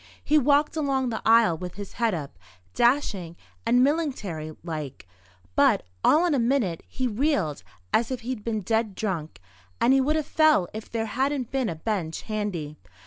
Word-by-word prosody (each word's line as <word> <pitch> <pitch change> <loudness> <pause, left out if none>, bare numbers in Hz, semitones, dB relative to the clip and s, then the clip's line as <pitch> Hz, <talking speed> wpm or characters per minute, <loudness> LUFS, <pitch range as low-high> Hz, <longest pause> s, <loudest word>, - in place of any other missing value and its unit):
He 305 +1 +4
walked 290 +3 +3
along 270 -4 0
the 220 - -3
aisle 225 -8 +5
with 180 -1 -6
his 200 0 -8
head 230 -5 +1
up, 140 - -7 0.3
dashing 215 - +1 0.3
and 245 +2 +5
millingtary 210 - -2
like; 150 - -6 0.5
but, - - +4 0.2
all 325 +4 +5
in 345 - +2
a 275 - +2
minute, 235 -8 +1
he 260 - -3
reeled 215 - 0 0.3
as 230 0 +2
if 255 -2 -4
he'd 235 -2 -5
been 220 -1 -2
dead 220 0 0
drunk, 165 - -3 0.4
and 255 - +4
he 270 - +4
would 300 +4 +1
have 310 -2 0
fell 310 - +3
if 220 0 -7
there 225 -1 -2
hadn't 260 +2 -1
been 265 -4 0
a 165 - -3
bench 165 -2 -3
handy. 190 -9 -4
225 Hz, 175 wpm, -26 LUFS, 180-270 Hz, 0.5 s, aisle